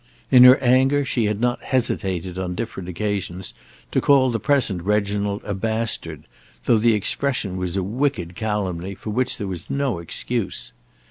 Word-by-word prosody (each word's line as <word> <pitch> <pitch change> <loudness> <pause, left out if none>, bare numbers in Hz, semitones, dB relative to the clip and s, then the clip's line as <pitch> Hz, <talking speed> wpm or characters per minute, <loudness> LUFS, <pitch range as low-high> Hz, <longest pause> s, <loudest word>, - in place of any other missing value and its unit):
In 125 -1 +9
her 125 +1 +9
anger 135 +3 +3
she 120 -4 0
had 105 0 -1
not 120 +1 0
hesitated 95 -8 -2
on 90 -1 -3
different 95 -4 -5
occasions 95 -1 -3 0.4
to - - +1
call 135 -3 +4
the 115 - -1
present 115 -8 +2
Reginald 100 +1 -1
a 100 - -3
bastard, 110 +3 -3 0.4
though 115 - +4
the 115 0 +4
expression 105 -1 -1
was 90 0 -3
a 95 - 0
wicked 105 -5 -1
calumny 100 -4 -3
for 105 +3 -6
which 130 +4 0
there 105 - -4
was 90 -3 -6
no 135 -9 -1
excuse. 105 +5 -4
105 Hz, 160 wpm, -22 LUFS, 95-125 Hz, 0.4 s, In